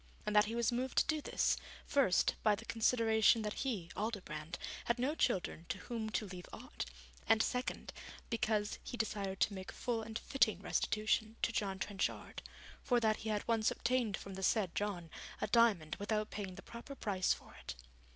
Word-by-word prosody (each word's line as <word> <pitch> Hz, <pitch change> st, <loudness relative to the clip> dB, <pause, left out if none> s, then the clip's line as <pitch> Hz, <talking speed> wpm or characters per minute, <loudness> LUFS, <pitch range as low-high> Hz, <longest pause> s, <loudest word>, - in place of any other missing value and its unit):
And 210 Hz, 0 st, -1 dB
that 210 Hz, +1 st, +7 dB
he 225 Hz, +2 st, -3 dB
was 235 Hz, 0 st, +2 dB
moved 250 Hz, +2 st, -2 dB
to -, -, +6 dB
do 310 Hz, -1 st, 0 dB
this, -, -, +2 dB, 0.3 s
first, 260 Hz, -11 st, +3 dB
by 210 Hz, -1 st, +4 dB
the 225 Hz, +3 st, -10 dB
consideration 225 Hz, -1 st, +4 dB
that 210 Hz, -1 st, -2 dB
he, 210 Hz, -11 st, -2 dB
Aldobrand, 175 Hz, -7 st, -3 dB, 0.3 s
had 235 Hz, -, +2 dB
no 260 Hz, +5 st, +1 dB
children 185 Hz, -, 0 dB
to -, -, -1 dB
whom 225 Hz, -3 st, -4 dB
to 215 Hz, -, -1 dB
leave 180 Hz, -2 st, -8 dB
aught, -, -, -6 dB, 0.4 s
and 220 Hz, 0 st, +5 dB
second, 250 Hz, 0 st, -2 dB, 0.4 s
because 215 Hz, -2 st, 0 dB
he 245 Hz, -, -5 dB
desired 200 Hz, -4 st, -2 dB
to 205 Hz, -, +3 dB
make 190 Hz, -1 st, -6 dB
full 235 Hz, -2 st, -1 dB
and 220 Hz, 0 st, -4 dB
fitting 215 Hz, -9 st, +2 dB
restitution 215 Hz, +2 st, +1 dB
to -, -, +3 dB
John 200 Hz, -3 st, -1 dB
Trenchard, 195 Hz, 0 st, -2 dB, 0.4 s
for 245 Hz, -2 st, +3 dB
that 220 Hz, -2 st, +2 dB
he 220 Hz, -, -4 dB
had 210 Hz, -1 st, -1 dB
once 225 Hz, -2 st, +3 dB
obtained 240 Hz, -5 st, +1 dB
from 195 Hz, -, -8 dB
the 190 Hz, -, -6 dB
said 190 Hz, -2 st, +2 dB
John 180 Hz, -6 st, -2 dB, 0.3 s
a -, -, 0 dB
diamond 210 Hz, -8 st, +3 dB
without 215 Hz, +1 st, -1 dB
paying 195 Hz, -3 st, -4 dB
the 195 Hz, -, -10 dB
proper 235 Hz, +4 st, -8 dB
price 190 Hz, -7 st, +1 dB
for -, -, -3 dB
it. -, -, -5 dB
215 Hz, 185 wpm, -36 LUFS, 195-230 Hz, 0.4 s, that